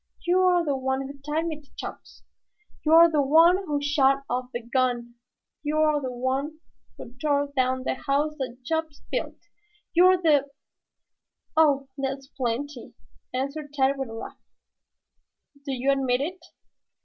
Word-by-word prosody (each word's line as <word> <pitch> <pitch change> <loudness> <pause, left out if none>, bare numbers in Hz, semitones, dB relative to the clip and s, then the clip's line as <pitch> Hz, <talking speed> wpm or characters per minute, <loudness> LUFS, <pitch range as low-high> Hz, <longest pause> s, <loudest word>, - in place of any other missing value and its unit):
You're 360 -1 +3
the 285 -2 0
one 265 0 -1
who 280 +1 -9
tied 300 +4 -2
me 310 -2 -4
to 285 - -27
Chops. - - -9 0.6
You're 325 +2 +7
the 300 -2 +3
one 325 +6 +6
who 310 -7 -2
shot 275 -2 +2
off 250 +1 -2
the 240 - -5
gun. 240 -1 -1 0.5
You're 305 0 +1
the 260 -2 -3
one 265 +5 -2 0.4
who 240 - -10
tore 285 -1 0
down 260 0 +1
the - - 0
house 280 +4 0
that 250 -1 -5
Chops 320 0 -3
built. - - -3 0.6
You're 370 +2 +6
the 295 -5 +3 0.5
" - - -54
"Oh, 285 -4 +3
that's 270 0 -3
plenty," 255 +1 -4 0.4
answered 280 +3 -4
Tad 275 -1 +2
with 265 -3 -3
a - - -8
laugh. 225 - -8 1.2
"Do 280 - -4
you 265 +1 +1
admit 265 -2 +1
it?" 360 +6 -4
280 Hz, 150 wpm, -26 LUFS, 260-310 Hz, 1.2 s, You're